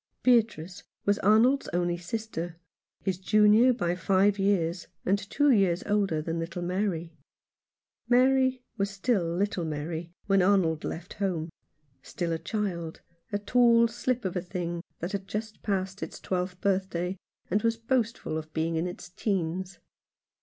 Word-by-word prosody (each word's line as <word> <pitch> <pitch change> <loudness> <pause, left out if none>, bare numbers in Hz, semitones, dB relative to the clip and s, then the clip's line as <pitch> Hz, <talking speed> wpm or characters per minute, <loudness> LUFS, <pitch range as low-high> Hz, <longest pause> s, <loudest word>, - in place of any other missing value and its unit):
Beatrice 210 -8 +2 0.2
was 205 0 +2
Arnold's 230 +7 +4
only 175 0 +1
sister, 175 -2 -5 0.5
his 185 -2 -1
junior 215 +5 +5
by 175 -8 0
five 195 +3 +2
years, 185 -3 +1 0.2
and 195 +2 +2
two 280 +8 +2
years 195 -6 +3
older 195 -7 +1
than 165 +1 -2
little 170 +1 -4
Mary. 175 -2 -2 1.0
Mary 260 0 +4
was 200 0 0
still 200 0 0
little 175 +2 -1
Mary 160 +2 -4
when 195 -1 +3
Arnold 180 -5 +3
left 175 +4 -5
home, 175 -5 -2 0.5
still 170 +4 -3
a 165 - -2
child, 175 -7 -3 0.3
a 205 - +1
tall 235 +2 +4
slip 240 0 -2
of 185 - -2
a 180 - 0
thing 175 -1 -4 0.2
that 175 +3 -3
had 195 -2 -4
just 215 0 -5
passed 190 -1 -2
its - - -6
twelfth 180 0 -3
birthday, 190 -2 0 0.4
and 205 +3 +2
was 230 0 +1
boastful 230 -8 -1
of 155 0 -10
being 165 +1 0
in 165 +3 0
its 175 - -7
teens. 185 -1 -2
190 Hz, 145 wpm, -28 LUFS, 170-210 Hz, 1.0 s, junior